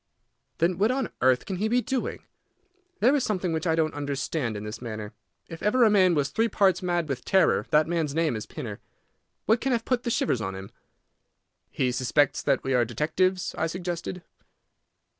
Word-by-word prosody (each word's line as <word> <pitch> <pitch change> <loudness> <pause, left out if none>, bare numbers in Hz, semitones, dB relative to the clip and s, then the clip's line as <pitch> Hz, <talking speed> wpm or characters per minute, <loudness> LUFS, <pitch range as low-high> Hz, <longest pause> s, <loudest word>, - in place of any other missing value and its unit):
"Then 170 +2 +1
what 210 +3 +3
on 265 +1 -1
earth 130 0 +3
can 190 - -4
he 210 +4 0
be 240 +3 +2
doing? 260 0 -3 0.8
There 255 +6 +5
is 280 - +1
something 185 -5 -1
which 160 +2 -2
I 160 - +3
don't 160 -1 +1
understand 140 -4 -2
in 105 - -6
this 105 +2 -7
manner. 110 -3 -6 0.3
If 165 - -9
ever 240 +4 +3
a 220 - +5
man 185 -4 +4
was 145 -2 +1
three 225 +11 +1
parts 195 -3 +2
mad 175 -3 0
with 135 -4 -4
terror, 190 -1 +3
that 155 0 +4
man's 160 -4 -1
name 160 -6 +1
is 110 -1 -6
Pinner. - - -7 0.7
What 225 +2 +3
can 265 -1 +1
have 230 -1 -1
put 250 -2 0
the 245 - -3
shivers 225 - 0
on 95 -3 -4
him?" 95 0 -9 1.0
"He 125 -1 0
suspects 130 +3 +1
that 140 -2 +1
we 135 - -1
are 125 -1 +4
detectives," 175 - 0
I 160 - +1
suggested. 175 +1 -5
165 Hz, 195 wpm, -26 LUFS, 135-200 Hz, 1.0 s, There